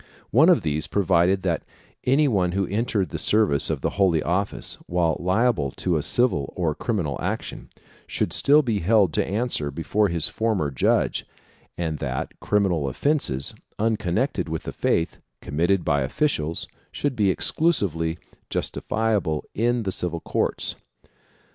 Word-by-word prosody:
One 150 Hz, -, +6 dB
of 175 Hz, -, +4 dB
these 75 Hz, -1 st, -1 dB
provided 95 Hz, -1 st, +2 dB
that 85 Hz, -3 st, 0 dB, 0.4 s
any 140 Hz, +4 st, +4 dB
one 95 Hz, -8 st, +1 dB
who 100 Hz, 0 st, +1 dB
entered 105 Hz, -1 st, -1 dB
the -, -, -5 dB
service 105 Hz, -10 st, +2 dB
of -, -, -2 dB
the -, -, 0 dB
Holy 85 Hz, -5 st, +3 dB
Office 95 Hz, +5 st, -1 dB
while 85 Hz, -2 st, +1 dB
liable 95 Hz, -, +1 dB
to 90 Hz, -2 st, 0 dB
a 75 Hz, -, +1 dB
civil 75 Hz, -, +1 dB
or 85 Hz, -4 st, +1 dB
criminal 90 Hz, -, -2 dB
action, -, -, -4 dB, 0.4 s
should -, -, -2 dB
still 150 Hz, +2 st, +5 dB
be 115 Hz, -5 st, 0 dB
held 100 Hz, -2 st, +3 dB
to -, -, +2 dB
answer 105 Hz, -8 st, -2 dB
before 80 Hz, +8 st, 0 dB
his 85 Hz, -4 st, 0 dB
former 105 Hz, -10 st, -1 dB
judge, 65 Hz, -, +1 dB, 0.5 s
and 80 Hz, -3 st, -2 dB
that 65 Hz, -2 st, -3 dB
criminal 95 Hz, -8 st, +1 dB
offences, 70 Hz, -, 0 dB, 0.2 s
unconnected 105 Hz, -, 0 dB
with 80 Hz, 0 st, -3 dB
the -, -, -6 dB
faith, 80 Hz, -, 0 dB, 0.2 s
committed 85 Hz, +5 st, 0 dB
by 70 Hz, -2 st, +2 dB
officials 80 Hz, -, -1 dB, 0.2 s
should 145 Hz, -3 st, -2 dB
be 105 Hz, -4 st, +2 dB
exclusively 90 Hz, -, 0 dB, 0.3 s
justiciable 105 Hz, -9 st, -1 dB
in 120 Hz, +2 st, +1 dB
the 95 Hz, -, -2 dB
civil 85 Hz, -2 st, -2 dB
courts. -, -, -1 dB
95 Hz, 145 wpm, -24 LUFS, 80-110 Hz, 0.5 s, One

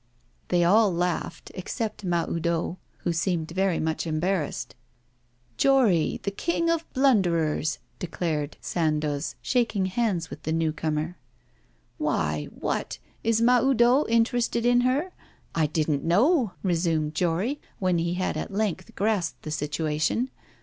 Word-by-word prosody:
They 175 Hz, -1 st, +3 dB
all 205 Hz, +4 st, +5 dB
laughed, 175 Hz, 0 st, -2 dB
except 210 Hz, +3 st, -4 dB
Mahoudeau, 170 Hz, 0 st, -1 dB, 0.2 s
who 175 Hz, -, 0 dB
seemed 165 Hz, -1 st, -1 dB
very 190 Hz, -1 st, +1 dB
much 160 Hz, +1 st, -1 dB
embarrassed. 155 Hz, -6 st, -1 dB, 0.8 s
'Jory, 240 Hz, -, +3 dB
the 200 Hz, -, -1 dB
King 335 Hz, +9 st, 0 dB
of 330 Hz, 0 st, -2 dB
Blunderers,' 175 Hz, -, +2 dB, 0.2 s
declared 160 Hz, -4 st, -2 dB
Sandoz, 155 Hz, -3 st, -1 dB
shaking 230 Hz, -6 st, +1 dB
hands 185 Hz, -4 st, -1 dB
with 155 Hz, -, -8 dB
the 155 Hz, -, -3 dB
new 160 Hz, -1 st, +1 dB
comer. 155 Hz, +2 st, -2 dB, 0.8 s
'Why? 75 Hz, 0 st, 0 dB
What? -, -, -3 dB, 0.3 s
Is 225 Hz, 0 st, +2 dB
Mahoudeau 250 Hz, +2 st, +4 dB
interested 235 Hz, 0 st, +2 dB
in 245 Hz, 0 st, +5 dB
her? 275 Hz, +9 st, +1 dB, 0.4 s
I 160 Hz, -2 st, +2 dB
didn't 150 Hz, -2 st, 0 dB
know,' 225 Hz, -, +3 dB
resumed 165 Hz, -4 st, +1 dB
Jory, 185 Hz, -, 0 dB, 0.2 s
when 185 Hz, -3 st, +1 dB
he 170 Hz, +1 st, -1 dB
had 185 Hz, 0 st, -1 dB
at -, -, -4 dB
length 195 Hz, -3 st, -2 dB
grasped 200 Hz, -5 st, 0 dB
the 155 Hz, -, -5 dB
situation. 155 Hz, -, -1 dB
180 Hz, 125 wpm, -26 LUFS, 160-230 Hz, 0.8 s, all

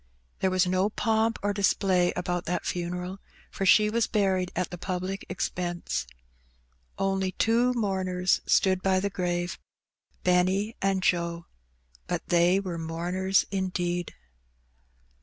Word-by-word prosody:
There 190 Hz, -, +2 dB
was 185 Hz, 0 st, +2 dB
no 185 Hz, +2 st, +1 dB
pomp 220 Hz, +1 st, +1 dB
or 205 Hz, 0 st, +1 dB
display 190 Hz, -2 st, +2 dB
about 175 Hz, 0 st, -2 dB
that 180 Hz, -, -2 dB
funeral, 180 Hz, +2 st, -3 dB, 0.3 s
for 195 Hz, -, -2 dB
she 210 Hz, +2 st, +6 dB
was 230 Hz, +2 st, +1 dB
buried 190 Hz, -3 st, +1 dB
at 180 Hz, 0 st, -2 dB
the 180 Hz, -, -6 dB
public 185 Hz, +2 st, -3 dB
expense. 175 Hz, -, -3 dB, 0.9 s
Only 195 Hz, -1 st, 0 dB
two 235 Hz, +2 st, +2 dB
mourners 190 Hz, -5 st, 0 dB
stood 185 Hz, -1 st, +3 dB
by 190 Hz, -1 st, +2 dB
the 200 Hz, +1 st, -2 dB
grave, 175 Hz, -1 st, -2 dB, 0.6 s
Benny 185 Hz, +4 st, +2 dB
and 195 Hz, -1 st, +1 dB
Joe, 170 Hz, -1 st, 0 dB, 0.6 s
but -, -, -2 dB
they 175 Hz, +2 st, +4 dB
were 180 Hz, -4 st, -4 dB
mourners 175 Hz, +4 st, 0 dB
indeed. 175 Hz, -2 st, -2 dB
185 Hz, 125 wpm, -27 LUFS, 180-195 Hz, 0.9 s, she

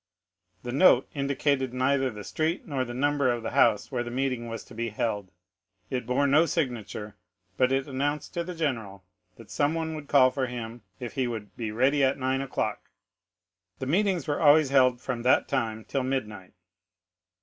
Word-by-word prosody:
The 120 Hz, -, -4 dB
note 145 Hz, +9 st, +5 dB
indicated 140 Hz, -2 st, 0 dB
neither 130 Hz, +1 st, +2 dB
the 105 Hz, -3 st, -8 dB
street 160 Hz, -, -2 dB
nor 135 Hz, -4 st, -1 dB
the 120 Hz, -1 st, -6 dB
number 140 Hz, 0 st, +1 dB
of 120 Hz, -1 st, -3 dB
the -, -, -3 dB
house 110 Hz, -4 st, +3 dB
where 125 Hz, -3 st, -1 dB
the 120 Hz, -, -4 dB
meeting 125 Hz, -1 st, -2 dB
was 115 Hz, -1 st, -6 dB
to -, -, -15 dB
be 115 Hz, +1 st, -3 dB
held; 105 Hz, -3 st, -2 dB, 0.6 s
it 125 Hz, -3 st, -3 dB
bore 125 Hz, +3 st, +2 dB
no 150 Hz, +4 st, +4 dB
signature, 120 Hz, -, -3 dB, 0.4 s
but 130 Hz, +3 st, +2 dB
it 135 Hz, +1 st, 0 dB
announced 145 Hz, +2 st, -2 dB
to 170 Hz, -, -2 dB
the 180 Hz, +1 st, -7 dB
general 115 Hz, -, -3 dB, 0.3 s
that 115 Hz, -, -14 dB
someone 160 Hz, +2 st, 0 dB
would 150 Hz, -2 st, -7 dB
call 130 Hz, -3 st, +5 dB
for 130 Hz, 0 st, -1 dB
him 120 Hz, -1 st, -6 dB, 0.2 s
if 120 Hz, -2 st, -6 dB
he 130 Hz, -2 st, 0 dB
would 110 Hz, -4 st, -6 dB
be 115 Hz, -2 st, -4 dB
ready 135 Hz, +6 st, +2 dB
at 135 Hz, 0 st, +2 dB
nine 130 Hz, 0 st, 0 dB
o'clock. 135 Hz, -2 st, -3 dB, 0.9 s
The 130 Hz, -, -5 dB
meetings 185 Hz, +2 st, +1 dB
were 145 Hz, -, -1 dB
always 150 Hz, -1 st, +6 dB
held 130 Hz, -2 st, +4 dB
from 125 Hz, -2 st, -4 dB
that 125 Hz, +2 st, +3 dB
time 110 Hz, -5 st, -2 dB
till 135 Hz, -, -1 dB
midnight. 110 Hz, -8 st, -4 dB
130 Hz, 180 wpm, -27 LUFS, 120-145 Hz, 0.9 s, always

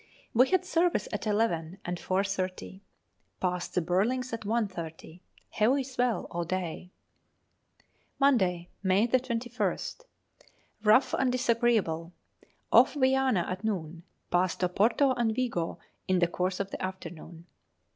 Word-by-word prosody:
We 250 Hz, +3 st, +5 dB
had 370 Hz, -1 st, +2 dB
service 340 Hz, -, +1 dB
at 210 Hz, +1 st, -3 dB
eleven 190 Hz, -5 st, 0 dB
and 175 Hz, 0 st, -3 dB
4.30. 190 Hz, 0 st, -2 dB, 0.6 s
Passed 180 Hz, -1 st, -2 dB
the 180 Hz, -, +2 dB
Burlings 230 Hz, +9 st, 0 dB
at 230 Hz, -, -3 dB
1.30. 185 Hz, -6 st, -4 dB, 0.3 s
Heavy 255 Hz, +6 st, +2 dB
swell 250 Hz, -3 st, -1 dB
all 170 Hz, 0 st, -2 dB
day. 180 Hz, 0 st, -4 dB, 1.3 s
Monday, 185 Hz, -11 st, +2 dB
May 195 Hz, +3 st, +3 dB
21st. 240 Hz, -, -2 dB, 0.8 s
Rough 220 Hz, +5 st, +5 dB
and 260 Hz, -1 st, +2 dB
disagreeable. 230 Hz, -9 st, +1 dB, 0.6 s
Off -, -, +6 dB
Viana 260 Hz, -8 st, +2 dB
at 185 Hz, +3 st, -4 dB
noon. 170 Hz, -6 st, -3 dB, 0.3 s
Passed 180 Hz, 0 st, +1 dB
Oporto 225 Hz, +9 st, +3 dB
and 225 Hz, -2 st, 0 dB
Vigo 230 Hz, -10 st, -1 dB, 0.3 s
in 185 Hz, -, +3 dB
the 175 Hz, -, +4 dB
course 180 Hz, +2 st, -2 dB
of 195 Hz, 0 st, -3 dB
the -, -, -6 dB
afternoon. 175 Hz, -3 st, -7 dB
200 Hz, 120 wpm, -29 LUFS, 180-245 Hz, 1.3 s, Off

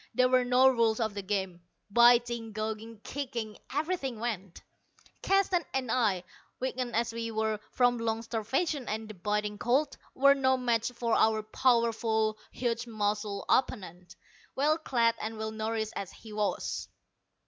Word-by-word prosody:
There 255 Hz, 0 st, +4 dB
were 255 Hz, 0 st, +4 dB
no 250 Hz, +1 st, +5 dB
rules 230 Hz, -3 st, +3 dB
of 220 Hz, -2 st, 0 dB
the 200 Hz, -, -4 dB
game. 190 Hz, -3 st, -3 dB, 0.3 s
Biting, 235 Hz, -1 st, +4 dB
gouging, 220 Hz, +1 st, -5 dB
kicking 245 Hz, -6 st, -5 dB
everything 290 Hz, -5 st, -2 dB
went. 200 Hz, -6 st, -4 dB, 0.6 s
Keston 385 Hz, -3 st, +2 dB
and 255 Hz, -3 st, -1 dB
I, 210 Hz, -8 st, +1 dB, 0.4 s
weakened 255 Hz, -2 st, -3 dB
as 230 Hz, 0 st, 0 dB
we 230 Hz, 0 st, -3 dB
were 220 Hz, -1 st, -1 dB
from 245 Hz, -1 st, +2 dB
long 225 Hz, 0 st, -1 dB
starvation 250 Hz, +6 st, -1 dB
and 220 Hz, +1 st, -3 dB
the 215 Hz, -, -8 dB
biting 210 Hz, +2 st, -2 dB
cold, 265 Hz, +5 st, +1 dB, 0.2 s
were 275 Hz, +1 st, +6 dB
no 260 Hz, -1 st, +2 dB
match 235 Hz, -2 st, 0 dB
for 235 Hz, -1 st, -2 dB
our 220 Hz, -1 st, +3 dB
powerful, 225 Hz, -2 st, +1 dB
huge 240 Hz, -1 st, -2 dB
muscled 205 Hz, -2 st, -2 dB
opponent, 180 Hz, -8 st, -1 dB, 0.4 s
well 305 Hz, +4 st, +2 dB
clad 235 Hz, -6 st, +2 dB
and 220 Hz, +1 st, -4 dB
well 220 Hz, 0 st, -3 dB
nourished 220 Hz, 0 st, -2 dB
as 195 Hz, -, -5 dB
he 220 Hz, -2 st, -12 dB
was. 210 Hz, -1 st, -2 dB
230 Hz, 150 wpm, -30 LUFS, 215-250 Hz, 0.6 s, were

